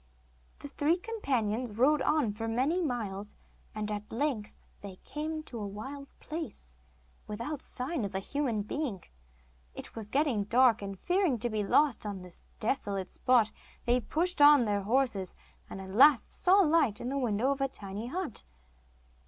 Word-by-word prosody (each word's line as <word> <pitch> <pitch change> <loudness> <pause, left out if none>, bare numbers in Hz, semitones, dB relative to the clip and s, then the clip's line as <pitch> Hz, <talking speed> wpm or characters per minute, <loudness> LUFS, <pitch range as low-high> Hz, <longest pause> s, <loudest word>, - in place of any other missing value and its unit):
The - - -8
three 295 +4 +1
companions 255 - -2
rode 275 +5 +4
on 295 -9 +2
for 225 +2 -4
many 265 +10 +1
miles, 210 - -3 0.4
and 215 0 -3
at 210 0 -5
length 235 -4 -2 0.3
they 200 -2 -8
came 310 +1 -4
to 240 -6 -7
a 205 - -3
wild 265 +8 -7
place, 290 - -6 0.5
without 235 +8 -4
sign 255 +1 -2
of 200 -1 -4
a - - +1
human 235 -1 -1
being. 220 - -3 0.7
It - - -8
was 220 -2 -6
getting 270 -7 +1
dark, 240 +1 +4
and 195 -1 -5
fearing 360 -7 +1
to 235 +1 -2
be 215 -1 0
lost 280 +5 +3
on 195 -3 -5
this 180 -1 -7 0.2
desolate 200 -5 -2
spot 240 -4 +3 0.3
they 245 +1 +3
pushed 335 +6 -1
on 290 -4 +8
their 205 -1 0
horses, 215 -3 0 0.3
and - - -7
at 190 0 -8
last 265 +5 +5
saw 385 +2 +5
a - - +2
light 300 -9 +3
in 245 - -4
the 280 +1 -1
window 240 +1 +1
of 275 0 -2
a 275 - +3
tiny 205 -2 -7
hut. 340 - -4
245 Hz, 170 wpm, -30 LUFS, 210-290 Hz, 0.7 s, on